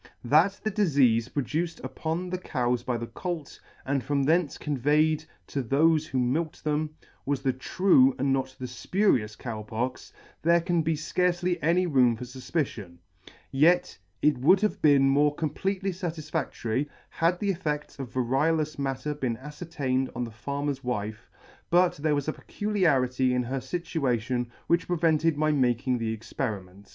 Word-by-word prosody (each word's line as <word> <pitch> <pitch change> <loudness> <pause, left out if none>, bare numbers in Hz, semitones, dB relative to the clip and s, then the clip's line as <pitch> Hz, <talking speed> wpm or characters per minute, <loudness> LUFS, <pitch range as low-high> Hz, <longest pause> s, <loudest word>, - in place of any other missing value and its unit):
That 160 +10 +3
the 215 - 0
difeafe 135 - +3
produced 160 +5 -2
upon 170 +3 -3
the 185 - -2
cows 125 -7 -1
by 125 0 -2
the 115 - -4
colt, 170 +2 -6 0.3
and 135 -1 0
from 140 +2 0
thence 160 +1 +2
conveyed 150 +3 +1 0.2
to 140 - -3
thofe 155 +5 +3
who 135 - -3
milked 140 +6 -1
them, 155 0 -1 0.3
was 140 -1 -2
the 135 -2 +2
true 135 -1 +4
and 135 +1 +1
not 130 -1 -2
the 130 - -5
fpurious 125 - 0
Cow 115 -3 -5
Pox 115 +4 -4 0.2
*, - - -29
there 170 +2 +4
can 170 0 +1
be 160 0 0
fcarcely 175 +3 0
any 175 +4 +3
room 130 -7 +4
for 115 - -7
fufpicion; 125 - -4 0.5
yet 155 +6 +3 0.3
it 150 -4 +3
would 185 +9 +5
have 215 - 0
been 140 -3 +5
more 145 +2 +3
completely 190 +5 -2
fatif 170 -4 -5
fadtory, 135 -4 -1 0.2
had 170 +2 +1
the 200 -1 +1
effedts 150 -5 -4
of 130 -3 -6
variolous 145 +5 0
matter 135 +1 -2
been 130 -6 -2
afcertained 140 -2 -3
on 125 - -2
the 115 - -5
farmer's 140 +4 -3
wife, 110 -2 -4 0.4
but 180 +1 +3
there 150 0 +1
was 145 0 -2
a 155 - 0
peculiarity 135 -11 +1
in 125 - +1
her 130 +3 -3
fltuation 130 -5 -1 0.2
which 170 +1 +1
prevented 165 -2 +2
my 155 0 +2
making 125 -2 +1
the 115 -1 -1
experiment. 100 -4 -5
145 Hz, 160 wpm, -27 LUFS, 125-165 Hz, 0.5 s, would